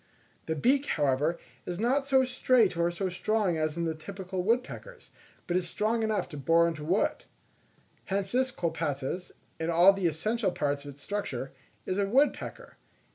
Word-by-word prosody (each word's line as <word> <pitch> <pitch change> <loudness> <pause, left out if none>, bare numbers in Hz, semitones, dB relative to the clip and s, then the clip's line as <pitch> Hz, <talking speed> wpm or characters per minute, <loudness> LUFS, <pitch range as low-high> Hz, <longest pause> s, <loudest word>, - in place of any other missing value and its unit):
The 160 - 0
beak, 270 - +2
however, 145 +3 +1 0.3
is 175 - -3
not 265 +6 +1
so 265 -1 +4
straight 250 -5 +3
or 170 0 +2
so 175 +2 -2
strong 190 0 0
as 155 0 -1
in 170 - 0
the 160 - 0
typical 185 +3 -5
woodpeckers 250 - -2 0.3
but 175 - -1
it - - +5
is 175 -2 -5
strong 220 +4 0
enough 215 -4 0
to 150 - -8
bore 165 +5 +4
into 160 -3 -4
wood. 180 +7 0 0.8
Hence 195 0 -2
this 260 +1 +2
Colaptes, 165 - -3 0.3
in 160 +1 -1
all 175 +4 +7
the 195 -3 0
essential 210 +7 0
parts 145 -3 -1
of 140 -1 -8
its 145 - -16
structure, 135 -11 -3 0.3
is 185 - -1
a 200 -1 +1
woodpecker. 275 +7 0
185 Hz, 175 wpm, -29 LUFS, 160-220 Hz, 0.8 s, all